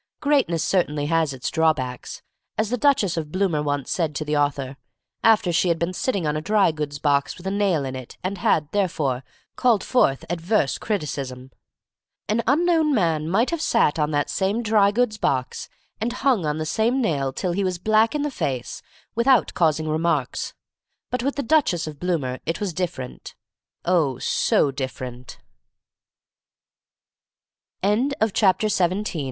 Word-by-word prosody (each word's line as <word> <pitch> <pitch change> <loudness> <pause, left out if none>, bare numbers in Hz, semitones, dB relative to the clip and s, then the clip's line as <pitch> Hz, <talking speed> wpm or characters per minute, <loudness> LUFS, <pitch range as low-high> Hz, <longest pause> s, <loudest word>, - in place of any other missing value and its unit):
Greatness 270 - +1
certainly 150 -6 0
has 165 -1 +1
its 130 -2 -4
drawbacks, 145 -7 -1 0.3
as 220 +1 0
the - - +2
Duchess 230 - +2
of 155 -2 -4
Bloomer 185 -5 0
once 145 -2 -2
said 160 -4 -1
to 155 - -3
the 150 0 -1
author, 140 -2 0 0.5
after 210 -5 +4
she 180 - +2
had 170 -1 +2
been 170 +2 -2
sitting 195 -3 -1
on 150 0 0
a 155 - -2
dry 200 +1 +3
goods 150 -2 -4
box 140 -1 +1
with 180 - -13
a 190 - -1
nail 195 -8 +1
in 130 0 -5
it, 130 -2 -9
and 185 +1 -3
had, 155 -3 +2
therefore, 150 -10 0 0.3
called 235 -5 +2
forth 140 - +2
adverse 175 - 0
criticism. 135 - -4 0.8
An 215 +3 +1
unknown 315 +1 +3
man 165 -6 +1
might 225 - +2
have 335 -2 -2
sat 230 - +2
on 150 0 +1
that 145 -1 0
same 205 +5 0
dry 215 -2 +4
goods 215 0 0
box 130 -6 -1 0.3
and 230 +3 -1
hung 250 - +1
on 150 0 -1
the 155 - -3
same 225 +10 +1
nail 140 - 0
till 180 +6 -2
he 195 +3 -1
was 185 -2 -1
black 220 - +2
in 295 - 0
the 295 - -2
face 130 - -3 0.3
without 235 +1 +3
causing 155 -2 +1
remarks, 155 -4 -1 0.6
but 250 - 0
with 275 +3 -1
the 280 - -2
Duchess 245 - +2
175 Hz, 140 wpm, -23 LUFS, 150-220 Hz, 0.8 s, after